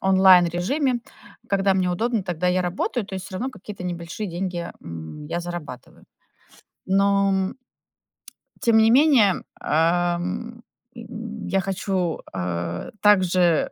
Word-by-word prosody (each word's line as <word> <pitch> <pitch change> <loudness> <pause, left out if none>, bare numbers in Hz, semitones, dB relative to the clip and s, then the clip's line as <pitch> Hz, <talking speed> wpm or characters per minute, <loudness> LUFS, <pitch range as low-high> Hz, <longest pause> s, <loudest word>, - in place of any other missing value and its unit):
онлайн-режиме. 190 - +4 0.5
Когда 195 -1 +2
мне 185 -1 +1
удобно, 225 +4 0
тогда 180 -1 -2
я 180 0 +2
работаю, 190 +5 -2
то 195 - -7
есть 185 0 -7
всё 190 - -10
равно 255 +7 -3
какие-то 205 -5 -10
небольшие 175 +3 -4
деньги, 175 0 -4
м, 85 - -8
я 165 +3 -2
зарабатываю. 170 -8 -8 0.8
Но, 200 +1 +3
м 190 +3 -1 1.1
тем 230 -1 +4
не 220 0 +5
менее, 250 - +5 0.2
ам, 175 +8 0 0.3
м, 225 -1 -7
я 195 - +1
хочу, 190 -3 -2
а, 85 -1 -3
также 185 -5 +3
185 Hz, 125 wpm, -23 LUFS, 175-210 Hz, 1.1 s, не